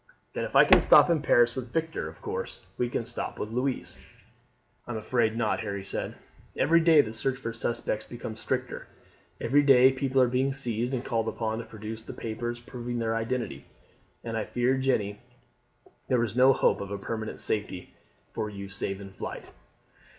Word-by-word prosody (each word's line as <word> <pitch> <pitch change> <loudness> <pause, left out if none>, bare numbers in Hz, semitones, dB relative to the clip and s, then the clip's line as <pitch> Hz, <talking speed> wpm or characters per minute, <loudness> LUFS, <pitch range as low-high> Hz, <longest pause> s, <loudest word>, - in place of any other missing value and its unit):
"Then - - -2
if - - -7
she - - +8
can - - +7
stop - - +7
in 160 -3 +2
Paris 120 -4 +4
with 125 -2 -5
Victor, 165 +2 -2
of - - -16
course 475 +3 -5
we 120 - -1
can 120 - -2
stop 120 +1 -5
with 105 - -4
Louise?" 125 +2 -2 0.9
"I 120 - -4
am - - -3
afraid 110 0 0
not," 110 -2 +1
Harry 100 -3 -4
said. 100 - -3 0.4
"Every 165 +5 +4
day 160 -2 +6
the 110 -4 -6
search 130 +4 -1
for 115 -4 -5
suspects 115 -2 -2
becomes 115 -2 -7
stricter; - - -3 0.5
every 140 +5 +3
day 135 -2 +7
people 135 0 0
are 130 - +6
being 130 +2 +1
seized 120 -2 -1
and 125 - -4
called 115 -2 -1
upon 110 0 -2
to 115 - -6
produce 110 0 -7
the - - -9
papers 120 +1 -4
proving 120 0 -6
their 115 -1 0
identity; 115 +2 -3 0.6
and 115 -1 -4
I 110 - 0
fear, 125 +2 +1
Jeanne, 110 -6 0 0.9
there 125 -2 +3
is 110 -1 -3
no 130 +1 +7
hope 130 - +2
of 100 0 -5
permanent 110 0 -4
safety 100 -4 -3 0.4
for 105 - -2
you 100 -1 -8
save 100 0 -3
in 100 -1 -9
flight." - - -7
120 Hz, 185 wpm, -28 LUFS, 110-130 Hz, 0.9 s, she